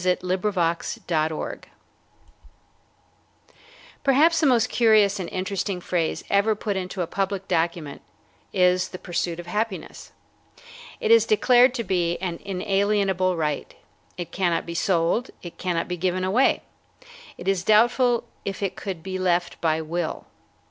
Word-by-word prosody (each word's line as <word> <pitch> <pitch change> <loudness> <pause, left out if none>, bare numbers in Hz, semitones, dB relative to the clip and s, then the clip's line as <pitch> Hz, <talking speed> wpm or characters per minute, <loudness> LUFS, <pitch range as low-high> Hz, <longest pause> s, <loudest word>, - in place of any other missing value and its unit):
THE 180 0 +2
PURSUIT 185 +1 -2
OF 210 -1 0
HAPPINESS 165 -2 -1 2.4
Perhaps 310 +5 +4
the 310 - +3
most 240 -4 +3
curious 215 -4 +4
and 180 - -4
interesting 190 0 -3
phrase 170 -2 -2
ever 200 +2 +2
put 205 -1 -3
into 185 0 -3
a - - -2
public 195 +2 -3
document 165 -3 -1 0.5
is 180 -1 +2
"the 185 - -7
pursuit 175 -1 -3
of 175 - -7
happiness." 210 +2 -4 0.9
It 455 -2 0
is 460 - +7
declared 255 - +5
to 235 - -2
be 175 -4 0
an 175 -3 -4
inalienable 195 -1 0
right. 150 -3 -2 0.4
It 175 -2 -6
cannot 175 -3 0
be 170 - -6
sold. 175 +6 +1
It 175 - -10
cannot 175 -2 -1
be 180 - -3
given 185 +1 -1
away. 210 +8 +2 0.7
It 175 - -9
is 195 -2 +1
doubtful 240 +3 +3 0.2
if 195 0 -4
it 195 - -2
could 185 -5 -6
be 185 0 -4
left 175 -1 0
by 160 -1 +1
will. 165 +1 -3
185 Hz, 140 wpm, -24 LUFS, 175-210 Hz, 2.4 s, is